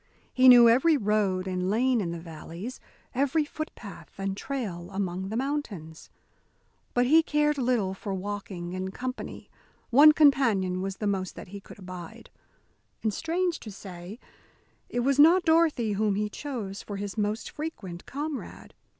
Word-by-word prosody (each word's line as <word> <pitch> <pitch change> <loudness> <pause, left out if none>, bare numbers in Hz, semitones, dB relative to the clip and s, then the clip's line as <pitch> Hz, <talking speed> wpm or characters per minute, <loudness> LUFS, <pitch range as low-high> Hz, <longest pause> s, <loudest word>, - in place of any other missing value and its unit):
He 255 0 +7
knew 240 -1 +9
every 270 +7 +5
road 205 -4 +1
and 185 -1 -2
lane 240 +3 +2
in 175 - -2
the 170 - -4
valleys, 170 +8 -8 0.3
every 280 +4 +1
footpath 295 -9 -8
and 195 0 -2
trail 195 -9 -5
among 190 -1 -3
the 220 - -3
mountains. 225 - -4 0.9
But 245 0 +4
he 315 +6 +6
cared 300 -2 +1
little 235 -7 +1
for 200 +1 -6
walking 190 -2 -5
in 185 0 -3
company; 255 +6 -6 0.4
one 290 +5 +9
companion 230 -12 +3
was 195 0 -4
the 215 - -4
most 190 -2 -1
that - - -10
he 200 +1 -8
could - - -14
abide. 185 -3 -10 0.7
And, 220 -2 +1
strange 345 - -1
to 215 - -9
say, 190 0 -9 0.7
it 245 - -1
was 275 +3 +1
not 345 +5 +7
Dorothy 320 -9 +3
whom 205 0 +1
he 210 +1 -1
chose 215 -7 -5
for 205 - -6
his 200 -1 -5
most 210 +1 -2
frequent 200 - -7
comrade. 290 +1 -6
210 Hz, 155 wpm, -27 LUFS, 190-275 Hz, 0.9 s, knew